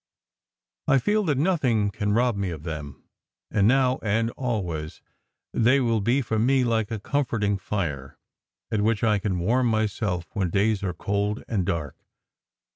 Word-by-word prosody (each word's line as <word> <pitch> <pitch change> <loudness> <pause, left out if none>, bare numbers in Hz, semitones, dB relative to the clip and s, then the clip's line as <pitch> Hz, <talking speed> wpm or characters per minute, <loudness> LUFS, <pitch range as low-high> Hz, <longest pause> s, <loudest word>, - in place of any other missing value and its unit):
I 135 - +5
feel 210 - +2
that 145 -5 +1
nothing 130 - +2
can 105 +1 -2
rob 120 0 +2
me 100 -2 -2
of 80 -3 -7
them, 75 -5 -6 0.5
and 100 -1 +3
now 130 +1 +3
and 115 +2 0
always 90 -13 -3 0.5
they 125 +4 +4
will 115 -4 +1
be 125 +7 +2
for 110 -1 -1
me 130 +3 +3
like 110 -3 0
a 110 - -3
comforting 105 -4 -1
fire, 75 -10 -4 0.5
at 110 -2 +1
which 110 +2 +1
I 105 -2 +3
can 95 -2 -1
warm 120 +8 +2
myself 105 -5 -1
when 95 -5 0
days 100 +3 +1
are 90 -3 -3
cold 100 +1 -1
and 95 -6 -1
dark. 75 -5 -2
105 Hz, 160 wpm, -25 LUFS, 95-120 Hz, 0.5 s, I